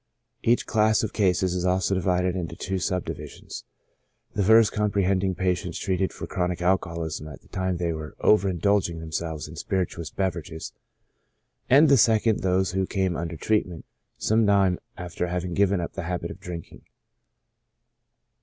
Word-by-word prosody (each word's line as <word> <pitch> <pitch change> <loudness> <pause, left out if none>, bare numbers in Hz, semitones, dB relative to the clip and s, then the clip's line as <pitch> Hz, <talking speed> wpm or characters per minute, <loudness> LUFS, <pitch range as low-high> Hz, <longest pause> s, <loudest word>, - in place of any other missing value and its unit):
Each 120 0 +2
class 110 0 +3
of 110 - -3
cases 95 -3 +2
is 90 -1 -1
also 90 +1 +1
divided 90 -1 +1
into 85 -3 -4
two 95 +3 -3
sub 90 -1 -1
divisions: - - -8 0.7
the - - 0
first 110 +2 +6
comprehending 100 -2 +1
patients 90 -2 -1
treated 95 0 -1
for - - -7
chro 90 -1 -1
nic 90 - -3
alcoholism 85 -4 -1
at 75 - -10
the - - -23
time 95 -1 -1
they 85 -1 -1
were 80 -1 -7
over 100 -2 +4
indulging 95 -2 +1
them 80 -1 -8
selves 80 -2 -3
in 80 +2 -11
spirituous 90 -6 -2
beverages; 85 -4 -4 1.0
and 145 +5 +7
the 140 -1 +6
second 110 -1 +3
those 95 0 +1
who 95 0 0
came 95 -3 0
under 85 0 -4
treatment 90 -3 -1 0.3
some 110 +1 +2
time 95 -3 +3 0.2
after 90 0 -3
having 90 0 -3
given 100 0 +2
up 85 - -4
the 95 - -4
habit 90 0 -3
of - - -10
drinking. 85 -2 -8
90 Hz, 165 wpm, -25 LUFS, 85-100 Hz, 1.0 s, and